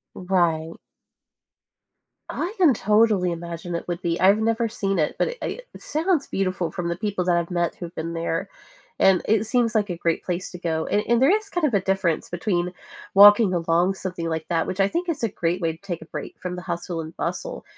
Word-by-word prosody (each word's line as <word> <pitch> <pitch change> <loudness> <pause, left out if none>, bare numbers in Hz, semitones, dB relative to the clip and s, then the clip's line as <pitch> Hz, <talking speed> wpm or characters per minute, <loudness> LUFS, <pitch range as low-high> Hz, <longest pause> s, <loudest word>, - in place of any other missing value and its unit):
Right. 170 -3 0 1.6
I 370 +6 -3
can 340 -8 +5
totally 210 -3 +3
imagine 170 0 -6
it 170 - -4
would 175 0 -3
be. 170 0 -1
I've 195 +3 +5
never 225 +1 +1
seen 195 -4 -2
it, 150 - 0
but 485 - 0
i - - -1 0.3
it - - -11
sounds 320 -1 0
beautiful 185 -3 -1
from 175 -2 -4
the 170 - -2
people 200 -2 -2
that 175 -1 +2
I've 170 +1 -1
met 175 -1 0
who've 175 -1 -8
been 165 +1 -4
there. 165 +3 -2 0.5
And 190 -2 +4
it 220 0 +2
seems 230 0 +1
like 210 -2 +1
a 175 - -2
great 165 -1 -1
place 180 0 -3
to 180 - -7
go. 160 -2 -2
And 205 - +1
and 235 0 +3
there 280 +9 +5
is 430 -2 -6
kind 350 -5 0
of 245 - -1
a 200 - +4
difference 190 -4 0
between 175 0 -1 0.4
walking 205 0 +8
along 175 +2 +2
something 180 -3 -4
like 160 -1 -3
that, 165 -2 0
which 185 - -3
I 195 - +5
think 350 - -2
is 305 -8 -1
a - - +2
great 175 -1 -2
way 165 -1 0
to 160 - -14
take 180 -4 -5
a - - -7
break - - -7
from 180 0 -4
the 180 - -7
hustle 175 -1 -4
and 160 0 -8
bustle. - - -4
185 Hz, 220 wpm, -24 LUFS, 170-215 Hz, 1.6 s, walking